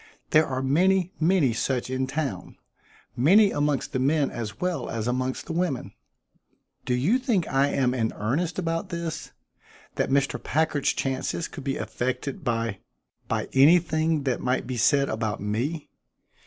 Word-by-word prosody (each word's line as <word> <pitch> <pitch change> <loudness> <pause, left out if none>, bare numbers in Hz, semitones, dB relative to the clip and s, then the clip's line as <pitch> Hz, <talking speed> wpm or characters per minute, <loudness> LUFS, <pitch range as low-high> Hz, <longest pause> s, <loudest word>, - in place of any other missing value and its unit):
There 155 0 +5
are 130 -1 -2
many, 180 +6 +2
many 160 -6 +3
such 125 +2 -1
in 130 0 -1
town; 135 - -4 0.6
many 195 - +5
amongst 145 -2 -1
the 130 - 0
men 140 +2 +2
as 110 -3 -6
well 180 -1 -2
as 115 -1 -3
amongst 130 +1 -2
the - - -5
women. 170 -7 -2 0.9
Do 125 - +1
you 175 - +2
think 230 - 0
I 135 +1 +2
am 130 -3 +1
in 115 -3 0
earnest 145 +12 -1
about 165 +1 -2
this 170 -3 -5 0.7
that - - 0
Mr. 140 +1 +1
Packard's 155 -2 +1
chances 135 +5 -2
could 145 - -9
be 135 0 -2
affected 130 +6 -3
by 115 -5 -1 0.5
by - - -1
anything 160 +1 +4
that 130 -3 -1
might 130 +1 0
be 125 +1 -4
said 140 +4 +3
about 110 -1 -2
me? 120 +10 -3
140 Hz, 155 wpm, -26 LUFS, 125-165 Hz, 0.9 s, There